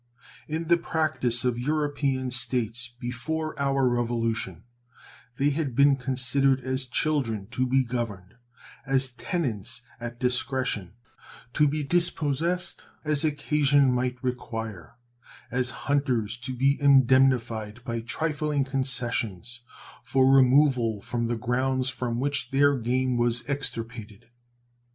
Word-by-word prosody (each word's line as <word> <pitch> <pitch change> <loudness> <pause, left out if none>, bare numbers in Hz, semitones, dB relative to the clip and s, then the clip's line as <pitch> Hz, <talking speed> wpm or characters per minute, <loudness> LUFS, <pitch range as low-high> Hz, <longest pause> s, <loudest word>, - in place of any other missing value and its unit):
In 160 +2 -3
the 170 0 +5
practice 155 -8 0
of 120 -1 0
European 145 -2 -1
States, 120 -1 -1
before 140 +6 -3
our 135 -1 +2
Revolution, 115 -1 -1 0.7
they 145 +1 +2
had 140 -4 -2
been 140 +1 +5
considered 135 +1 +1
as 130 +1 -1
children 125 -7 -1
to 130 0 0
be 135 +1 +3
governed; 115 -6 -4 0.5
as 135 0 +2
tenants 125 - -3 0.2
at 120 0 -7
discretion, 125 -6 0 0.6
to 150 - +4
be 150 +1 -1
dispossessed 170 +1 -1 0.2
as 150 -1 +1
occasion 145 -2 +2
might 125 0 -1
require; 115 -7 -5 0.6
as 125 0 +1 0.2
hunters 130 -7 0
to 125 +1 -5
be 140 +3 +2
indemnified 125 -5 +3
by 115 -2 -3
trifling 150 +3 -1
concessions 125 -4 -2 0.4
for 130 -1 +2
removal 130 -4 +4
from 120 +1 -2
the 120 0 -1
grounds 130 +3 0
from 120 -1 -3
which 140 +1 -1
their 140 +1 +4
game 125 +1 0
was 120 0 0
extirpated. 115 -5 -5
130 Hz, 115 wpm, -26 LUFS, 120-140 Hz, 0.7 s, the